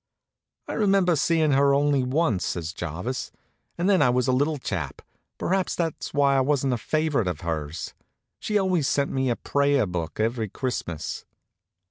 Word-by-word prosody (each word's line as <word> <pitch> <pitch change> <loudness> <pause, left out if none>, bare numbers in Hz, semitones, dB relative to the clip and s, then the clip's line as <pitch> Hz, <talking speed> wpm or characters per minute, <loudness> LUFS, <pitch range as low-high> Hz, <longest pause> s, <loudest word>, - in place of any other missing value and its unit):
"I - - -4
remember 195 -4 +3
seeing 155 +1 +2
her 140 0 +4
only 145 -1 +2
once," 125 - +1
says 85 -1 -3
Jarvis, 90 - -4 0.5
"and 175 - 0
then 195 -2 +4
I 125 - +5
was 125 +1 +1
a - - +3
little 145 +4 +1
chap. 85 - -4 0.3
Perhaps 190 +1 0
that's 165 -3 -3
why 140 -1 +3
I - - +4
was 140 0 +1
such 135 - 0
a 125 - +1
favorite 155 -6 0
of 90 -4 -3
hers. 80 -1 -4 0.5
She 210 - 0
always 185 -7 +1
sent 140 -1 +1
me 130 -1 0
a 120 - +1
prayer 140 -2 +1
book 90 -2 -4
every 110 -1 0
Christmas." 95 - -4
135 Hz, 170 wpm, -25 LUFS, 110-155 Hz, 0.5 s, I